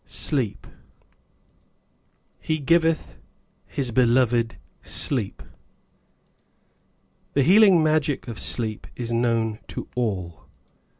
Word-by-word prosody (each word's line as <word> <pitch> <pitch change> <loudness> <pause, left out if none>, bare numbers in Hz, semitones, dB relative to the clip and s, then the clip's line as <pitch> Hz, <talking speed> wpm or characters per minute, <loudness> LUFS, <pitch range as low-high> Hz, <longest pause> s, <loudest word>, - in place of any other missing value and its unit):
Sleep 130 -9 -1 1.7
He 155 - -1
giveth 165 +2 +1 0.5
His 130 -4 -3
Beloved 120 -1 +2 0.2
Sleep. 120 -8 -4 1.9
THE 140 - +3
healing 190 0 +6
magic 155 -3 +1
of 115 -2 -6
sleep 110 -3 -3
is 120 -1 -5
known 115 -2 0
to - - -6
all. 95 -9 -3
125 Hz, 80 wpm, -24 LUFS, 115-155 Hz, 1.9 s, healing